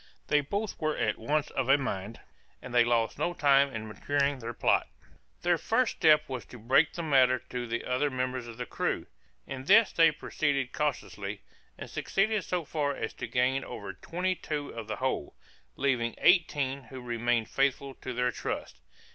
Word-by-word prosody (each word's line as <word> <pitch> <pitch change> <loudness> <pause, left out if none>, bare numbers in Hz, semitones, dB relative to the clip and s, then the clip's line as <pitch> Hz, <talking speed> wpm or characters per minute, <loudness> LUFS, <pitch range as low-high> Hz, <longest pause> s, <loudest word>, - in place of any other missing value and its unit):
They 150 - +4
both 200 +9 -3
were 155 -1 0
at - - 0
once 150 0 0
of 135 -1 -1
a 140 - +7
mind, 110 -5 -4 0.4
and 130 - -9
they 120 -1 +6
lost 115 -1 +1
no 175 - 0
time 140 -2 +4
in 110 -2 -5
maturing 140 +5 0
their 115 -1 -5
plot. - - +2 0.6
Their 175 -1 +3
first 225 +7 +1
step 155 -1 +5
was 130 -2 -5
to 125 - -11
break 130 +7 +3
the 170 - -4
matter 130 -4 +4
to 125 -1 -3
the 115 +1 -3
other 130 +4 +1
members 130 -2 -3
of 115 -1 -9
the 125 - -4
crew. - - -2 0.4
In 130 0 -7
this 215 +5 +6
they 165 -1 +6
proceeded 140 -3 -1
cautiously, 100 - -3 0.3
and - - -7
succeeded 210 0 0
so 175 -3 -2
far 145 -2 -1
as - - -4
to - - -6
gain 130 +2 +1
over 100 -1 -7
twenty 180 - -2
two 150 -4 -4
of 115 -2 -7
the - - -3
whole, 130 - -2 0.4
leaving 125 -4 0
eighteen 140 -7 +2
who 130 - -9
remained 120 -1 0
faithful 135 0 0
to 130 - -7
their 125 0 0
trust. 60 - -5
135 Hz, 180 wpm, -29 LUFS, 120-150 Hz, 0.6 s, a